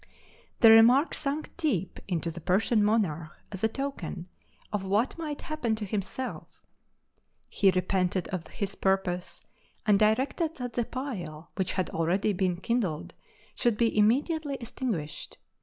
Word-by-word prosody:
The 225 - +9
remark 240 +7 +7
sunk 295 +1 -3
deep 195 - -1
into 170 -3 -1
the 170 +1 -9
Persian 205 +5 +2
monarch 170 -8 0 0.2
as 195 -1 -7
a - - +6
token 270 -8 -5 0.5
of 205 -2 -1
what 205 +6 +1
might 300 -3 -4
happen 275 -8 -1
to 215 -1 -4
himself: 210 +6 -5 0.8
he 195 - +3
repented 185 0 0
of 185 -4 -4
his 200 -3 -4
purpose, 190 -2 -1 0.4
and 205 -2 +4
directed 265 +9 +1
that 245 -2 -5
the 240 - 0
pile, 180 - -6
which 190 -3 -1
had 185 -1 -1
already 185 +6 +1
been 180 -2 0
kindled, 190 -6 -1 0.4
should 240 -4 +1
be 230 0 +2
immediately 280 +8 +2
extinguished. 225 - -4
210 Hz, 140 wpm, -28 LUFS, 185-250 Hz, 0.8 s, The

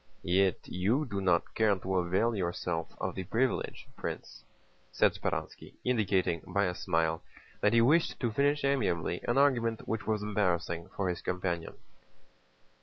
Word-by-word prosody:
"Yet 95 +1 +2
you 110 +12 +1
do 100 -6 -3
not 90 -3 +1
care 110 -2 +3
to 95 +1 -3
avail 95 +6 +1
yourself 85 -3 -2
of - - -2
the 95 - -4
privilege, 115 +7 -1
Prince," - - -6 0.5
said - - +3
Speránski, - - -4
indicating 95 -8 +1
by 100 +2 +1
a 90 - -1
smile 80 -2 0 0.4
that 105 - +3
he 115 - +6
wished 155 +8 +3
to 120 -3 0
finish 145 +5 +2
amiably 100 - 0
an 120 - +1
argument 120 -5 +2
which 110 0 -3
was 110 -1 0
embarrassing 90 -5 -1
for 100 - -1
his 90 -1 -2
companion. 90 -2 -2
100 Hz, 150 wpm, -31 LUFS, 90-115 Hz, 0.5 s, he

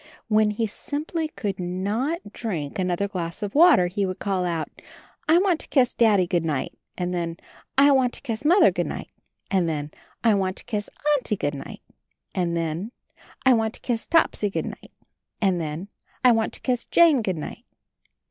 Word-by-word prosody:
When 215 -1 +4
he 210 +2 -1
simply 305 - -3
could 200 -10 -4
not 205 - -2
drink 170 -10 -4
another 180 +2 0
glass 175 -2 -5
of 200 - -3
water, 315 - +6
he 195 +3 -1
would 185 -1 -2
call 190 -3 -1
out, 165 -3 -1 0.6
"I 325 - +7
want 360 -3 +2
to - - -5
kiss 255 -4 +3
Daddy 210 -6 +4
good 175 -1 0
night" 150 -5 -2
— - - -47
and 180 0 -2
then, 170 -1 -2 0.4
"I 280 +1 +7
want 260 -3 +3
to - - -6
kiss 230 -4 -4
Mother 350 +7 +6
good - - -2
night" - - -6 0.2
— - - -42
and 185 -4 +2
then, 150 -1 -3 0.3
"I 225 -2 +5
want 190 -2 0
to - - -7
kiss 210 -4 -3 0.3
Auntie 215 -5 -3
good 145 -3 -1
night" 140 -1 -8 0.3
— - - -49
and 170 -2 0
then, 165 +6 -3 0.5
"I 260 - +7
want 225 -1 0
to - - -8
kiss 235 -3 -3
Topsy 325 -10 +2
good - - -2
night" - - -9 0.3
— - - -58
and 190 -5 +1
then, 160 +4 -4 0.4
"I 250 - +7
want 225 -1 +1
to - - -7
kiss 250 -2 0
Jane 325 -7 +5
good 190 -5 -1
night." 150 - -7
205 Hz, 200 wpm, -24 LUFS, 175-245 Hz, 0.6 s, I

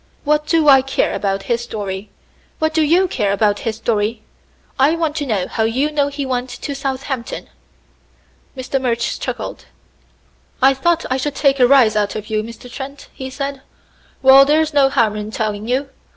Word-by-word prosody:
"What 300 0 +1
do 320 -2 +2
I 270 -2 +8
care 270 +1 -1
about 195 -1 -2
his 235 -1 -1
story? 205 -3 -5 0.5
What 315 0 0
do 320 - +2
you 345 +5 +3
care 210 - -1
about 205 0 +1
his 225 -1 -3
story? 215 0 -1 0.6
I 285 +5 +4
want 320 -3 -1
to 290 -2 -2
know 200 -6 -1
how - - -3
you 255 +7 +1
know 290 -2 +1
he 285 0 -4
went 255 -1 -2
to 250 +4 -6
Southampton." 265 -2 -4 1.1
Mr. 260 +1 -2
Murch 235 -2 -1
chuckled. - - -5 0.9
"I 270 +1 +5
thought 335 +5 0
I 260 - +2
should 285 +2 -3
take 275 -2 +2
a 250 - +6
rise 245 -5 +5
out 205 -1 0
of 215 +1 -6
you, 215 -1 +1
Mr. 230 +3 -10
Trent," 275 +3 -9
he 265 0 -7
said. 275 0 -5 0.6
"Well, 265 +1 +9
there's 310 +2 +2
no 280 -2 +4
harm 230 -6 +1
in 210 0 -5
telling 215 -1 -3
you. 260 +3 0
260 Hz, 180 wpm, -18 LUFS, 220-285 Hz, 1.1 s, Well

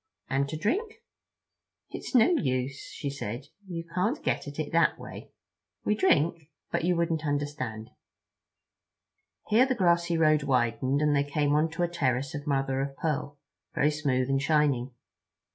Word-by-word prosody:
"And 140 +1 +1
to 155 - -4
drink?" 405 - -1 1.0
"It's - - -6
no 245 +7 +6
use," 130 - -1 0.3
said 120 +6 -4
she; - - -26 0.2
"you 170 -2 -4
can't 215 +11 0
get - - -1
at 145 - -8
it 155 -2 -3
that 165 0 +3
way. - - -10 0.6
We - - +3
drink—but 160 -6 0
you 180 +1 +2
wouldn't 165 -2 0
understand." 145 -7 -3 1.5
Here 235 +5 +4
the 260 - 0
grassy 170 -3 +2
road 155 -2 +4
widened, 130 +1 +1
and 150 -1 +3
they 140 - +3
came 145 0 0
onto 160 +3 +1
a - - +2
terrace 135 -5 -1
of 145 +1 -6
mother 135 -1 0
of 135 0 -4
pearl, 150 -2 -2 0.4
very 150 +2 +3
smooth 135 -4 0
and 135 0 +1
shining. 145 -4 +2
150 Hz, 150 wpm, -28 LUFS, 135-170 Hz, 1.5 s, no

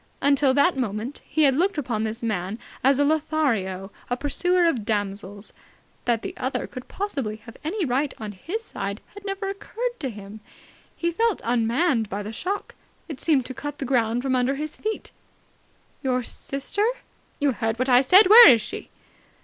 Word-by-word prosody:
Until 280 -1 +3
that 315 +5 +4
moment 235 +1 -3
he 315 - +2
had 270 -3 +5
looked 365 +4 +1
upon 240 -7 -2
this 220 +2 -4
man 200 -2 -2 0.3
as 270 +1 +4
a 285 - +3
Lothario, 265 -12 0 0.2
a 245 - 0
pursuer 355 +6 +1
of 265 -10 +1
damsels. 205 -1 -3 0.5
That 235 -2 +1
the - - -5
other 260 +2 -2
could 255 -1 -9
possibly 275 - -3
have 230 - -11
any 355 +4 -1
right 270 +2 0
on 215 -2 -6
his 350 - -5
side 200 - -5
had 405 -1 -11
never 390 0 -3
occurred 475 +5 -4
to 270 - -2
him. 205 -1 -10 0.6
He 340 0 -1
felt 450 +4 +1
unmanned 235 - +1
by 205 +1 -4
the 215 +2 -6
shock. 385 - -4 0.3
It 305 -6 -7
seemed 285 -6 +2
to 260 - -5
cut 290 +3 -6
the 275 - -4
ground 240 -2 +1
from 265 -1 +1
under 255 +2 +1
his 305 +2 -4
feet. 435 0 -4 0.9
"Your 255 -2 0
sister!" 280 - -2 0.5
"You 290 -2 +2
heard 225 -1 -2
what 255 +2 0
I 250 -1 +6
said. 370 +10 +7
Where 450 +1 +11
is 235 -4 +6
she?" - - -6
265 Hz, 180 wpm, -24 LUFS, 225-320 Hz, 0.9 s, Where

